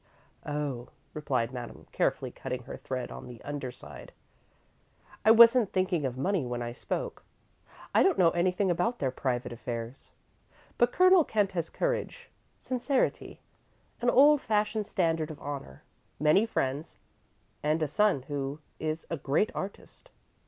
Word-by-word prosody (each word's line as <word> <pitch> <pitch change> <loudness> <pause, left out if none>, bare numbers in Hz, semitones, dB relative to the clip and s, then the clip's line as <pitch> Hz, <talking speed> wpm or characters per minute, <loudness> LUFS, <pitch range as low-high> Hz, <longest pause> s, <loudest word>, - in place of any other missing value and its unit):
"Oh," 145 -5 -3 0.2
replied 130 -6 -1
Madame, 120 -2 -8
carefully - - 0
cutting - - -5
her - - -8
thread - - -5
on 65 0 -8
the 120 -2 -10
underside, 140 -4 -7 1.1
"I 215 - +4
wasn't 230 -1 +7
thinking 185 -5 0
of 125 0 -6
money 185 +4 0
when 120 -1 -3
I 120 - -4
spoke. 485 - -4 0.7
I - - +5
don't 385 -3 +3
know 170 -2 +5
anything 180 +2 +1
about 205 +8 0
their 135 -2 -1
private 125 -2 -2
affairs. 120 +1 -6 0.7
But 240 0 +4
Colonel 370 +1 +6
Kent 205 -7 0
has 170 -4 -2
courage, - - -3 0.3
sincerity, 255 +1 -1 0.6
an 245 - +3
old 285 +3 +6
fashioned 215 -1 0
standard 165 -4 0
of 155 - -8
honour, 140 - -7 0.4
many 155 +9 +4
friends, 140 -2 -2 0.6
and 155 +2 +1
a - - +1
son 175 -3 +2
who 140 0 -4 0.2
is 155 +1 -3
a 165 - -1
great 145 +9 +1
artist." 195 +1 -8
160 Hz, 140 wpm, -29 LUFS, 135-215 Hz, 1.1 s, wasn't